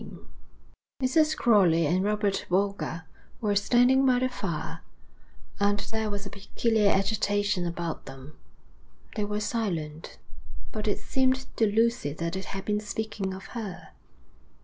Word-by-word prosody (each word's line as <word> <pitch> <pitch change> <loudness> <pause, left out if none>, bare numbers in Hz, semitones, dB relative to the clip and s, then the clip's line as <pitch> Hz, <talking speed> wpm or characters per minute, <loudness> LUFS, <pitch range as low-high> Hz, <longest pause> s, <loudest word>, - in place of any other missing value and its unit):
V - - -9 0.9
Mrs. 310 +4 +3
Crowley 180 -8 +4
and 180 +5 +2
Robert 205 -1 0
Boulger 190 -3 0 0.4
were 210 -3 0
standing 245 +6 +4
by 255 -2 +4
the 255 +1 +1
fire, 165 -8 -4 0.8
and 205 0 +3
there 220 -1 -1
was 205 0 -4
a 200 - -7
peculiar 210 +1 +1
agitation 205 -2 +1
about 170 -1 -4
them. 135 +2 -10 0.8
They 210 -2 0
were 210 0 -2
silent, 175 -9 -3 0.5
but 215 0 -4
it 205 - +1
seemed 260 0 +1
to 225 - +4
Lucy 225 -7 +1
that 170 +2 -3
they 190 - -2
had 195 0 -6
been 210 0 +1
speaking 210 -1 -3
of 190 +1 -7
her. 215 -7 -6
205 Hz, 140 wpm, -27 LUFS, 185-225 Hz, 0.9 s, Crowley